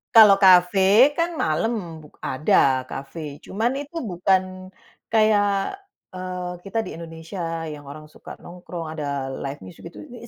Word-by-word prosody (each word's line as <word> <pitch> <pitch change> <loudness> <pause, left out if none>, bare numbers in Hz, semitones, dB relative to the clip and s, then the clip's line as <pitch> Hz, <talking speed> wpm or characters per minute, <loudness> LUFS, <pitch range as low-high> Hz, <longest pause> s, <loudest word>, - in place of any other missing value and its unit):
Kalau 215 -3 +9
kafe 190 +8 +6
kan 335 -1 -1
malam, 165 -1 -2
buk 150 - -19
ada 130 -1 +2
kafe. 145 +1 -7
Cuma 220 +8 -2
itu 285 +4 -6 0.2
bukan 185 +1 0 0.4
kayak, 210 - +2 0.3
eee, 185 -1 -5 0.2
kita 225 +3 -1
di - - -8
Indonesia 165 +2 -9 0.3
yang 145 -2 -10
orang 150 +1 -11
suka - - -11
nongkrong 175 -2 -8
ada 140 -4 -4
live 135 0 -6
music 95 - -11
itu, 170 - -11
eee, 235 -1 -11
180 Hz, 140 wpm, -23 LUFS, 155-210 Hz, 0.4 s, Kalau